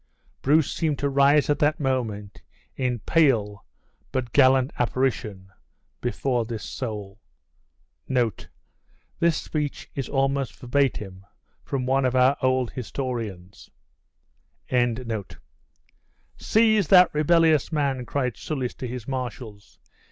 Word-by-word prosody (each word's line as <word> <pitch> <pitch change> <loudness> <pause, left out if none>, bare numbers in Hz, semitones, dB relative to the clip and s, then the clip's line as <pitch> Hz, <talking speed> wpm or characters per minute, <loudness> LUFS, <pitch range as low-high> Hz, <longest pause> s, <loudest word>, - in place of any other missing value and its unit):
Bruce 150 +1 +3
seemed 155 -3 -1
to 140 - -1
rise 140 +1 +4
at 145 - +1
that 150 +1 +2
moment 115 -8 -3 0.3
in 125 -2 -1
pale 110 - +2 0.5
but 125 -3 -3
gallant 130 -1 +4
apparition 115 -6 -1 0.5
before 120 0 -1
his 115 -3 -5
soul. 105 -5 -6 0.9
This 130 - -3
speech 150 -2 -4
is 135 - -4
almost 135 -1 0
verbatim 120 -8 -1 0.4
from 130 -2 -3
one 135 +1 +2
of 130 0 0
our 130 +2 +4
old 130 -2 +1
historians. 115 -7 -6 2.7
"Seize 220 -4 +3
that 180 0 +6
rebellious 160 0 +3
man," 140 -4 0
cried 125 -4 -2
Soulis 130 -5 -3
to 130 - -5
his 120 -2 -7
marshals. 120 -5 -6
130 Hz, 105 wpm, -24 LUFS, 120-140 Hz, 2.7 s, that